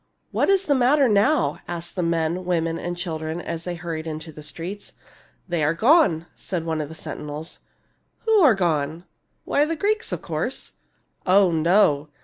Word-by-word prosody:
" - - -47
What - - +1
is 390 -1 +4
the 290 - +3
matter 270 +2 +4
now? 225 +8 +2
" - - -35
asked 170 -1 -6
men, 170 0 0
women, 165 -2 -1
and 175 0 -4
children, 160 -2 -3
as 165 -1 -5
they 180 -1 -3
hurried 165 -1 -5
into 160 +1 -6
the 150 - -11
streets. 170 +7 -7 0.3
" - - -33
They 170 -4 -1
are 150 +3 +2
gone," 220 - +4
said 175 -4 -4
one 160 -1 -1
of 145 - -5
the 160 - -9
sentinels. 150 +1 -7 0.3
" - - -45
Who 445 -1 +4
are 285 - +6
gone? 160 -3 -1
" - - -49
" - - -46
Why 285 - +2
the 330 +2 -2
Greeks, 430 +7 0
of - - -4
course." - - -3 0.3
" - - -44
Oh, 190 0 +5
no 160 -3 +3
170 Hz, 200 wpm, -23 LUFS, 160-210 Hz, 0.3 s, are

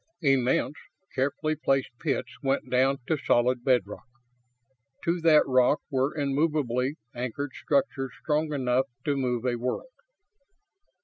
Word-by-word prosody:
Immense, 135 0 +2 0.4
carefully 140 +3 0
placed 135 -4 0
pits 150 -4 -1
went 135 0 -1
down 130 +2 +3
to 160 - 0
solid 120 +1 +2
bedrock. 120 -6 0 1.0
To 170 +1 0
that 160 -2 +6
rock 130 +2 +3
were 135 +3 0
immovably 140 -2 0 0.2
anchored 130 +3 -4
structures 135 -2 -1
strong 155 0 0
enough 130 -2 +1 0.2
to 145 - +1
move 125 -3 -1
a 120 -1 +1
world. 125 - -3
135 Hz, 120 wpm, -27 LUFS, 125-150 Hz, 1.0 s, that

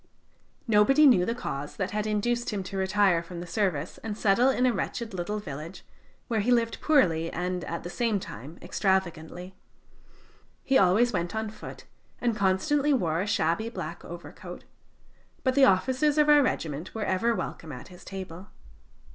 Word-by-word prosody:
Nobody 230 +8 +5
knew 195 -10 +6
the 230 - -1
cause 145 - -5
that 195 -1 -3
had 210 +1 -2
induced 235 +3 0
him 205 -3 -3
to 185 - -7
retire 190 -2 +2
from 170 0 -8
the 175 - -6
service 175 -5 -2
and 215 -1 -5
settle 225 +6 +4
in 255 -1 +2
a 250 - +3
wretched 230 -2 -4
little 185 +4 -3
village, 155 -2 -8 0.4
where 225 -3 0
he 210 +4 0
lived 235 -2 +1
poorly 170 - +3
and, 180 0 -3
at 170 - -5
the 175 - -6
same 230 -2 0
time, 145 - -9
extravagantly. 180 -1 -1 1.1
He 270 - +1
always 215 +4 +4
went 170 +5 -2
on 220 -1 -2
foot, - - -10 0.4
and 235 -2 0
constantly 275 +10 +2
wore 170 - +1
a 200 - -3
shabby 185 +4 0
black - - -6
overcoat, - - -9 0.8
but 260 - +2
the 275 0 +6
officers 260 +8 +2
of 300 0 +4
our 295 -1 +7
regiment 160 - -2
were 220 - -2
ever 230 +5 +1
welcome 165 -4 -5
at 125 +4 -9
his 180 -1 -14
table. 190 -1 -8
200 Hz, 170 wpm, -27 LUFS, 175-235 Hz, 1.1 s, our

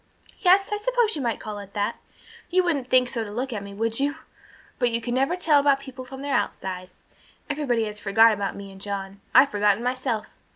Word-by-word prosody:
"Yes, 390 +1 +4
I 415 - 0
suppose 475 -1 +1
you 295 - -3
might 235 -3 -1
call 210 -1 -6
it 200 0 -11
that. 205 0 -1 0.5
You 370 +1 +3
wouldn't 285 -8 -1
think 255 -1 +4
so 235 -2 -2
to 210 - -7
look 245 +5 -3
at 210 - -4
me, 200 0 -9
would 225 +3 0
you? 285 +2 0 0.6
But 245 -2 +3
you 230 0 -1
never 270 +7 +1
can - - -12
tell 300 -3 +5
about 280 -1 +3
people 265 -2 -9
from 265 +1 -9
their 285 -1 -2
outsides. 185 -1 -3 0.5
Everybody 270 -6 0
has 210 0 -6
forgot 220 +3 +5
about 200 -1 -3
me 200 -1 -9
and 190 0 -14
John. 195 -1 -5
I'd 270 +2 +7
forgotten 205 +1 +2
myself. 250 -3 -1
245 Hz, 215 wpm, -25 LUFS, 205-280 Hz, 0.6 s, I'd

